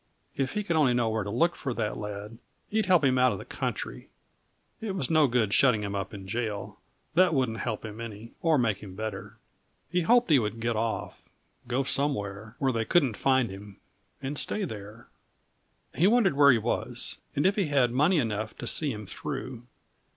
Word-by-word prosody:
If 135 -1 -1
he 210 0 -1
could 170 -4 -1
only 140 -6 +4
know 120 -2 +2
where 110 -1 -1
to 100 - -5
look 165 +11 +2
for 130 -4 -4
that 105 - -2
lad, 105 +2 -7 0.3
he'd 220 +1 +1
help 180 -4 +5
him 130 -2 +3
out 125 -2 +4
of - - -4
the - - -9
country. - - -5 0.7
It 210 -4 -4
was 140 -8 -2
no 155 -2 +5
good 115 -4 +1
shutting 125 -6 +4
him 100 0 -3
up 100 -1 -3
in 95 -2 -9
jail; 105 -2 -4 0.3
that 175 0 +4
wouldn't 120 -4 0
help 115 -2 -3
him 110 +1 -7
any, 115 0 -8
or 165 -3 +3
make 115 -5 +1
him 95 -3 -10
better. 110 -1 -6 0.5
He 180 +1 +2
hoped 240 +2 +4
he 145 - +7
would 110 0 -3
get 115 0 -1
off 110 +1 -3 0.4
go 125 +3 0
somewhere, 110 -7 -2
where 135 -2 +1
they 115 -1 0
couldn't 140 -3 +3
find 130 -5 +2
him, 100 0 -10 0.5
and 140 +2 -3
stay 210 - -2
there. 110 - -9 0.9
He 175 - +3
wondered 220 -3 +4
where 140 0 +7
he 125 - +4
was, 115 +2 +1 0.2
and 145 - +1
if 195 +1 +4
he 195 -6 +1
had 135 -4 +3
money 150 +9 +3
enough 110 -5 -2
to - - -6
see 150 -3 +1
him 105 -2 -6
through. 130 - -6
120 Hz, 200 wpm, -28 LUFS, 110-150 Hz, 0.9 s, he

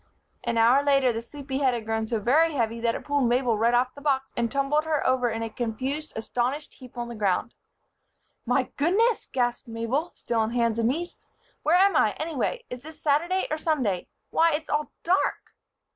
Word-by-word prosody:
An 230 - -1
hour 235 +5 +5
later, 275 -3 +3
the 225 - -3
sleepy 270 +2 -5
head 260 -3 +2
had 230 -2 -5
grown 220 0 -1
so 225 -1 -1
very 305 +9 +3
heavy 230 -3 -1
that 230 0 0
it - - -7
pulled 285 -2 +1
Mabel 245 -1 +2
right 230 +3 +2
off 250 +1 +2
the 285 - -12
box 270 -2 0
and 235 -1 -1
tumbled 280 +2 +1
her 315 -2 -1
over 255 -1 +2
in 225 0 -3
a 225 - -3
confused, 260 +7 -3
astonished 250 +6 -2
heap 255 -2 -14
on 240 0 -3
the 235 - -7
ground. 210 +1 0 0.9
"My - - 0
goodness!" 410 +10 +2
gasped 245 -2 -1
Mabel, 230 +8 -2
still 235 -1 -2
on 220 +1 0
hands 230 -2 +1
and 230 0 +2
knees. 340 +7 -3 0.4
"Where 330 +3 +4
am 390 -1 +4
I, 215 - +4
anyway? 325 - -2
Is 250 0 -6
this 315 +2 -11
Saturday 335 +6 +1
or 310 - -1
Sunday? 255 - 0 0.2
Why! 330 0 +4
It's 305 +1 -3
all 295 -1 -1
dark. 365 +3 0
260 Hz, 200 wpm, -26 LUFS, 230-300 Hz, 0.9 s, hour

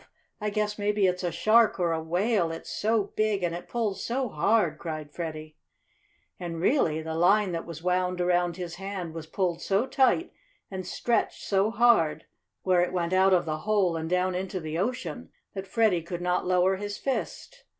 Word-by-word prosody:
I 210 -1 -1
guess 210 0 -2
maybe 205 -1 +2
it's 180 0 0
a 175 - 0
shark 215 +6 +4
or 175 -2 +1
a 160 -1 -1
whale, 175 +2 +1
it's 165 - -7
so 215 -1 0
big, 215 -3 +1
and 170 -1 0
it 175 - -7
pulls 220 -5 -2
so 255 +1 -1
hard!" 185 +1 +1
cried 155 -3 -6
Freddie. 155 -2 -6 0.8
And, 170 -2 -5
really, 165 - +2
the 160 0 -4
line 190 +4 +3
that 165 -1 -4
was 165 -1 -8
wound 180 0 0
around 175 -1 +1
his 175 -2 -6
hand 190 -3 -5
was 160 -1 -7
pulled 175 0 -1
so 200 +5 +1
tight, 270 +6 +2 0.4
and 190 -1 -5
stretched 240 -1 -1
so 195 +1 +2
hard, 195 -10 +3 0.4
where 185 -2 +3
it 180 - -1
went 175 0 -1
out 190 +1 +4
of 180 -2 +3
the 155 -1 -2
hole 200 -2 +1
and 160 0 -3
down 180 +1 +1
into 185 +1 -3
the 160 -1 -5
ocean, 245 +6 -3 0.2
that 195 -1 -6
Freddie 210 -5 +2
could 170 +1 -6
not 180 0 0
lower 185 +1 +3
his 205 +1 -5
fist. 275 - -4
185 Hz, 190 wpm, -27 LUFS, 170-210 Hz, 0.8 s, shark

